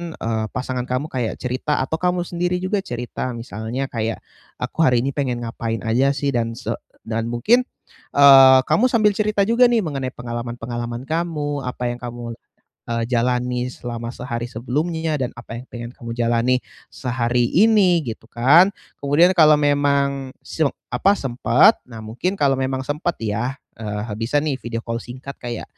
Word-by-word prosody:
eee, 110 -1 -2
pasangan 125 -1 -3
kamu 125 +5 -2
kayak 125 -4 -2
cerita 130 +4 -1
atau 160 +5 -2
kamu 180 0 +1
sendiri 175 +1 -1
juga 195 +2 0
cerita. 125 -5 -4
Misalnya 115 +4 -4
kayak 115 -1 -2 0.4
aku - - -5
hari 125 -3 +3
ini 140 - 0
pengen 130 -4 -2
ngapain 115 -1 -3
aja 130 +5 +2
sih 140 0 0
dan 115 -2 -1
se 125 - -4 0.3
dan 115 0 -2
mungkin 225 - +2 0.5
eee, 135 -2 +9
kamu 225 - +2
sambil 215 -3 +4
cerita 215 -1 +2
juga 235 +4 +5
nih 240 -2 +2
mengenai 135 -5 -3
pengalaman-pengalaman 120 0 -5
kamu 150 -4 -2
apa 125 0 -4
yang 120 - -6
kamu 120 -1 -6 0.6
eee, 115 0 -1
jalani 125 0 0
selama 120 -1 -6
sehari 120 -1 -4
sebelumnya 155 +7 -2
dan 125 - -1
apa 120 0 -7
yang 125 - -13
pengen 120 0 -7
kamu 120 -3 -7
jalani 120 +2 +2 0.3
sehari 120 -1 0
ini 190 -4 +5
gitu 110 - -23
kan. 150 +11 +5 0.3
Kemudian 150 +6 +4
kalau 155 -3 +7
memang 140 -2 +1
se 160 - -4 0.3
apa, 185 +11 +3
sempat, 130 - +4
nah 115 -2 -9
mungkin 125 - -2
kalau 140 -2 +3
memang 130 0 -1
sempet 150 +4 -2
ya, 110 +5 -2 0.2
eee, 105 0 -4
bisa 115 +5 -1
nih 145 -4 0
video 115 -1 -4
call 115 0 -2
singkat 130 +3 -8
kayak 120 -2 -5
125 Hz, 160 wpm, -21 LUFS, 120-150 Hz, 0.6 s, eee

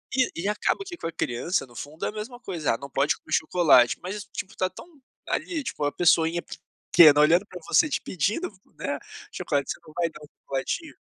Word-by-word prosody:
E 255 -1 +3
e - - -1
acaba 210 - 0
que 355 -2 -7
com 165 - -5
a - - -4
criança, 135 +3 -1
no 120 -2 -19
fundo, 150 +5 -6
é - - 0
a - - -5
mesma 220 +4 -7
coisa: 170 - -1
"Ah, - - -6
não 140 0 -9
pode 140 +2 +2
comer 155 - -9
chocolate", 155 -7 +4
mas 200 +3 -5
tipo 195 -2 -7
tá 185 0 0
tão 185 - -12 0.4
ali, 325 -6 -2
tipo 150 - -4
a 145 - +1
pessoinha 165 +1 +3 0.5
pequena, 150 -4 +9
olhando 170 +6 +5
pra 180 - -9
você, 305 - +4
te - - 0
pedindo, 210 - -1 0.3
né, - - -3 0.3
chocolate, 140 -2 -1
você - - -6
não 155 - -13
vai 170 -1 +1
dar - - -12
um - - -11
chocolatinho? 140 - -3
175 Hz, 215 wpm, -26 LUFS, 150-210 Hz, 0.5 s, pequena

